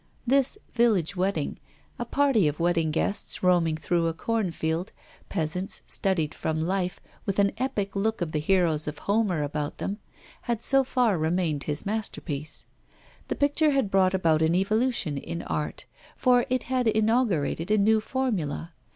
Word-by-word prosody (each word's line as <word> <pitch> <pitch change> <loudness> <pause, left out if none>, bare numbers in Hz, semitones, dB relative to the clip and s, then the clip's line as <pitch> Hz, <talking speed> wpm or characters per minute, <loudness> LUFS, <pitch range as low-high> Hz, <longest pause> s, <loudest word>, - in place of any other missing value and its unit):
This 275 +7 +3 0.2
'Village 215 -7 +2
Wedding' 180 -5 -1 0.4
a 240 - -2
party 265 - +3
of 145 0 -2
wedding 165 -2 +2
guests 180 +7 -1
roaming 170 -3 +3
through 170 +1 0
a 165 - -2
corn 220 +2 -1
field, 165 +2 -2 0.4
peasants 170 +4 -2
studied 165 -6 +1
from 155 0 -2
life, 180 +2 -1 0.3
with 195 - -1
an 200 -1 +4
epic 210 -7 -2
look 220 +3 0
of 170 -3 -2
the 155 - 0
heroes 160 -2 +2
of 150 0 -4
Homer 200 -7 +1
about 145 0 -3
them 205 +2 -4 0.5
had 235 -1 0
so 270 0 +4
far 245 -8 +1
remained 160 -2 0
his 150 -1 -3
masterpiece. 175 -8 -3 0.6
The - - -2
picture 290 +2 +2
had 270 -8 +1
brought 190 -1 +3
about 160 -4 +2
an 160 +1 +3
evolution 200 - +1
in 170 +4 -5
art, 150 - -4 0.3
for 245 -2 +3
it 255 0 0
had 255 -2 0
inaugurated 215 - +1
a 215 - +4
new 215 +2 +4
formula. 200 - -2
190 Hz, 160 wpm, -26 LUFS, 160-225 Hz, 0.6 s, an